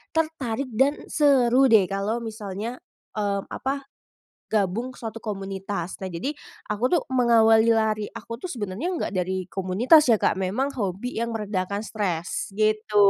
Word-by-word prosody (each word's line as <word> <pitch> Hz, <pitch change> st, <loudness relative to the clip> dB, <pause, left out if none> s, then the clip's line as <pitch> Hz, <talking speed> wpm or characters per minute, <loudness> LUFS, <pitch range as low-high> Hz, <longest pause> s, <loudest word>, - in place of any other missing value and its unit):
tertarik 280 Hz, -6 st, -1 dB
dan 270 Hz, +6 st, +1 dB
seru 265 Hz, -3 st, +4 dB
deh 215 Hz, -4 st, +6 dB
kalau 200 Hz, +4 st, -1 dB
misalnya, 220 Hz, +1 st, -5 dB, 0.3 s
mmm, 200 Hz, -2 st, -1 dB
apa, 275 Hz, +1 st, -3 dB, 0.7 s
gabung 215 Hz, +5 st, 0 dB
suatu 225 Hz, -1 st, -6 dB
komunitas. 195 Hz, -3 st, -4 dB
Nah, 190 Hz, -, -4 dB
jadi 215 Hz, -, -2 dB, 0.4 s
aku 210 Hz, +2 st, -3 dB
tuh -, -, +4 dB
mengawali 230 Hz, -3 st, +5 dB
lari 215 Hz, -1 st, +1 dB
aku 230 Hz, +1 st, -7 dB
tuh -, -, -4 dB
sebenarnya 210 Hz, -, -4 dB
nggak -, -, -2 dB
dari 185 Hz, 0 st, -2 dB
komunitas 220 Hz, -, +4 dB
ya, 235 Hz, -, +6 dB
Kak, -, -, +2 dB
memang 210 Hz, +10 st, -1 dB
hobi 200 Hz, +5 st, -3 dB
yang 235 Hz, 0 st, -2 dB
meredakan 200 Hz, -1 st, -2 dB
stres, 195 Hz, -4 st, -3 dB
gitu. 215 Hz, 0 st, 0 dB
220 Hz, 140 wpm, -25 LUFS, 195-245 Hz, 0.7 s, deh